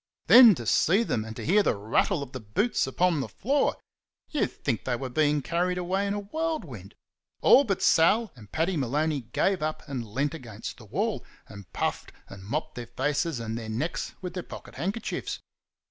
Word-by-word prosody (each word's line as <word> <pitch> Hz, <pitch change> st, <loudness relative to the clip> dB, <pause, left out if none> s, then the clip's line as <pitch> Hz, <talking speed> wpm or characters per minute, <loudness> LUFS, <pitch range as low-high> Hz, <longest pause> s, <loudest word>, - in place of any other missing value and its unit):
Then 240 Hz, -5 st, +9 dB
to 120 Hz, -, -7 dB
see 190 Hz, -, +3 dB
them 110 Hz, -, -1 dB
and 110 Hz, 0 st, -8 dB
to -, -, -6 dB
hear 200 Hz, +7 st, +4 dB
the -, -, +1 dB
rattle 130 Hz, -, +1 dB
of 135 Hz, -, -10 dB
the 130 Hz, -, -6 dB
boots 125 Hz, -, 0 dB
upon 170 Hz, +4 st, +1 dB
the 135 Hz, -, -2 dB
floor! 275 Hz, +6 st, 0 dB, 0.5 s
You'd 300 Hz, -, +1 dB
think 115 Hz, -, -3 dB
they 125 Hz, -, -1 dB
were 130 Hz, +2 st, -5 dB
being 150 Hz, 0 st, +2 dB
carried 180 Hz, +3 st, 0 dB
away 190 Hz, +3 st, -1 dB
in 200 Hz, -, -1 dB
a 205 Hz, -, -3 dB
whirlwind. 315 Hz, +9 st, -4 dB, 0.5 s
All 280 Hz, -, +7 dB
but 195 Hz, -4 st, -1 dB
Sal 205 Hz, +7 st, +4 dB
and 105 Hz, -5 st, -15 dB
Paddy 170 Hz, +4 st, 0 dB
Maloney 145 Hz, +2 st, 0 dB
gave 190 Hz, +5 st, +1 dB
up 155 Hz, 0 st, -3 dB
and 135 Hz, -4 st, -4 dB
leant 140 Hz, +6 st, -1 dB
against 115 Hz, -9 st, -8 dB
the 115 Hz, -, -13 dB
wall, 200 Hz, -, -2 dB, 0.2 s
and 100 Hz, -3 st, -12 dB
puffed -, -, -2 dB, 0.2 s
and 95 Hz, -1 st, -11 dB
mopped 155 Hz, +9 st, -3 dB
their 120 Hz, -1 st, -7 dB
faces 145 Hz, +4 st, -1 dB
and 115 Hz, -1 st, -4 dB
their 115 Hz, -1 st, -5 dB
necks 130 Hz, +10 st, -3 dB
with 180 Hz, -1 st, -4 dB
their 180 Hz, -, -3 dB
pocket -, -, -11 dB
handkerchiefs. 200 Hz, +6 st, -3 dB
155 Hz, 190 wpm, -27 LUFS, 120-195 Hz, 0.5 s, Then